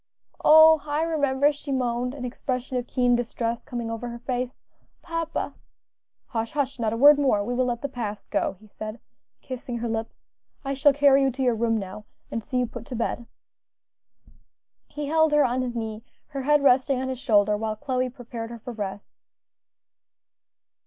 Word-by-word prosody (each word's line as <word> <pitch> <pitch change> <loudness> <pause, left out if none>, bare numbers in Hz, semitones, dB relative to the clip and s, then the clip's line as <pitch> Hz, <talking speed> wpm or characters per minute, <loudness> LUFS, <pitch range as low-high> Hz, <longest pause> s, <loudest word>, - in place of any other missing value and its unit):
"Oh! 315 0 +8
I 295 +2 0
remember," 290 -3 +2
she 290 0 -7
moaned, 250 0 -1
an 255 -3 -5
expression 255 +1 -3
of 245 -1 -2
keen 245 -1 +2
distress 235 -1 -2
coming 240 -4 -4
over 230 +2 -4
her 235 - -6
face; 245 +1 -2 0.5
"papa 330 -1 -3 0.4
" - - -62
"Hush! 225 -1 -2
hush! 275 -3 -1
not 225 -2 0
a 230 - -2
word 290 +3 +8
more; 255 -8 +2
we 240 +4 -3
will 255 +1 +1
let 240 0 -2
the - - 0
past 225 -6 -6
go," - - 0
he 215 - -18
said, 215 +2 -8 0.4
kissing 250 -2 -5
her 235 0 -3
lips. 225 0 -4 0.4
"I 275 - -1
shall 275 +2 +5
carry 280 -1 +5
you 270 - +3
to 265 +1 -3
your 250 -2 +3
room 225 0 +1
now, 200 +1 -6 0.3
and 230 - -3
see 255 - -3
you 250 - +2
put 240 0 -9
to 260 - -5
bed." 235 0 -2 1.6
He 295 0 -5
held 315 +1 +3
her 295 -1 +5
on 250 +1 0
his 245 -1 -3
knee, 220 -1 -4 0.3
her 275 -3 -4
head 295 +1 +3
resting 260 0 +4
on 260 - -2
his 260 -2 -4
shoulder, 210 -5 +3
while 215 0 -2
Chloe 255 +3 -1
prepared 235 -2 -7
her 235 - -7
for 240 +2 -8
rest. 200 -2 -7
250 Hz, 185 wpm, -25 LUFS, 230-275 Hz, 1.6 s, Oh